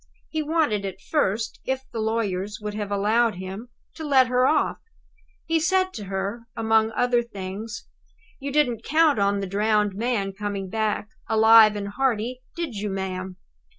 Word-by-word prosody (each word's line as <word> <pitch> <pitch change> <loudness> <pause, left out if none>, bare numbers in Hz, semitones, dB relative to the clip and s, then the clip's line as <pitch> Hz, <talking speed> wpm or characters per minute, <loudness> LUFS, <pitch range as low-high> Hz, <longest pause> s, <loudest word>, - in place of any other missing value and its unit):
He 315 - -2
wanted, 300 -10 +1
at 190 -1 -5
first, 220 -5 -1
if 265 0 -2
the 230 - -4
lawyers 210 -3 -1
would 210 -1 -5
have 210 -1 -4
allowed 215 +3 +2
him, 190 +6 -7 0.2
to 320 - -8
let 265 -4 +4
her 250 +1 +3
off. 305 +1 +1 0.7
He 325 0 +1
said 375 +3 +1
to 210 - -6
her, 195 +5 -4
among 220 -1 +3
other 245 +1 +2
things: 205 -1 -7 0.5
"You 280 0 -4
didn't 250 -6 +1
count 310 -4 +3
on 200 0 +2
the - - -2
drowned 210 +1 +1
man 205 -2 -1
coming 200 -2 -4
back, 215 -1 -1 0.2
alive 220 -1 +7
and 200 -1 -4
hearty, 250 +1 -1
did 335 -7 -3
you, 205 0 -3
ma'am?" 190 -1 -4
220 Hz, 160 wpm, -24 LUFS, 200-250 Hz, 0.7 s, alive